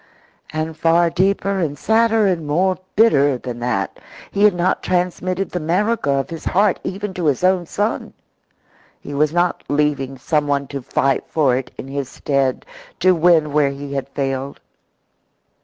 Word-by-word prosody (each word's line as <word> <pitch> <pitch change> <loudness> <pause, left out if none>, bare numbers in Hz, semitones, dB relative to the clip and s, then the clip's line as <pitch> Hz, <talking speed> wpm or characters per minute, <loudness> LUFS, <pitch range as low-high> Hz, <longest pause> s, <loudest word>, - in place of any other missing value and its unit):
And 155 +1 -3
far 165 +1 +3
deeper 195 +2 +1
and 150 -5 -2
sadder 225 +3 +3
and 175 -6 0
more 185 +5 +1 0.2
bitter 145 - +4
than 120 -1 -7
that, 120 -6 -2 0.3
he 200 - -2
had 205 -3 +4
not 175 +1 0
transmitted 180 +1 -1
the 180 - -2
America 185 +4 0
of 140 +3 0
his 165 - -7
heart 200 +1 +2
even 195 +1 -4
to 180 -2 -3
his 145 +3 +1
own 185 -2 +2
son. 210 +5 -2 0.9
He 145 - -8
was 150 +1 +2
not 175 +1 0
leaving 145 -2 0
someone 145 0 0
to 140 -1 -5
fight 135 +2 0
for 140 -6 +2
it 130 0 -3
in - - -7
his 135 -1 -4
stead, 135 -2 -1 0.3
to 185 - +5
win 165 -3 +3
where 145 -2 +3
he 140 0 -7
had 135 0 -3
failed. 135 0 -3
155 Hz, 160 wpm, -20 LUFS, 140-185 Hz, 0.9 s, to